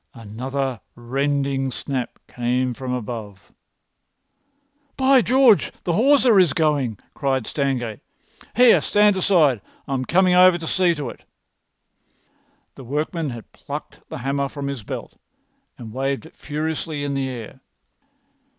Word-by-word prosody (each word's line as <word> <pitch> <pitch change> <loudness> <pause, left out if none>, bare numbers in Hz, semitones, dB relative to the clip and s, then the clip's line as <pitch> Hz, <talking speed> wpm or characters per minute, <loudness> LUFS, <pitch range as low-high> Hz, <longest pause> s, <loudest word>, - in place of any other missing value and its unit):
Another 125 +2 -4
rending 135 +2 -1
snap 130 -1 -4
came 125 +1 -1
from 130 +1 -6
above. 110 -5 -6 1.5
"By 265 -1 +5
George, 250 -3 +4
the 175 - 0
hawser 245 - +5
is 175 -7 +4
going!" 145 - +1 0.2
cried 135 -4 -1
Stangate. 125 -6 -2 0.6
"Here! 245 +1 +6
Stand 210 -1 +3
aside! 160 - +3 0.3
I'm 130 -1 -2
coming 185 +3 +3
over 180 0 +6
to 165 - -7
see 175 0 +2
to 140 -6 -4
it." - - -16 1.5
The 135 - -12
workman 150 +4 -2
had 120 -3 -9
plucked - - -8
the - - -6
hammer 140 +2 -1
from 140 0 -5
his 140 -4 -5
belt, - - -8 0.6
and 110 -3 -9
waved 135 +3 -2
it 160 - -15
furiously 155 0 -4
in 140 -1 -2
the 135 -1 -1
air. 120 -4 -8
140 Hz, 130 wpm, -22 LUFS, 125-170 Hz, 1.5 s, Here